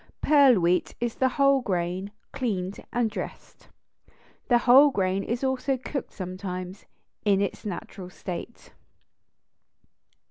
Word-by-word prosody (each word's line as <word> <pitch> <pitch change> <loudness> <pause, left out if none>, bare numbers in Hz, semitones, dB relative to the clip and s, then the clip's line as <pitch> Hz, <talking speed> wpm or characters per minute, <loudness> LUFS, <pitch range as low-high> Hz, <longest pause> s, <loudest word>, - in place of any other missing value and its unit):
Pearl 280 -7 +5
wheat 175 +1 +1
is 240 -1 -1
the 260 - +1
whole 275 0 +3
grain 185 -2 -2 0.2
cleaned 205 -8 -3
and 240 -1 +1
dressed. - - -8 0.8
The 240 - +5
whole 260 +4 +7
grain 195 -5 0
is 235 +3 -3
also 265 0 0
cooked 270 +2 -5
sometimes 185 0 -6 0.4
in 200 -2 +3
its 200 +1 -3
natural 190 -1 -7
state. 185 +5 -8
210 Hz, 115 wpm, -26 LUFS, 185-260 Hz, 0.8 s, whole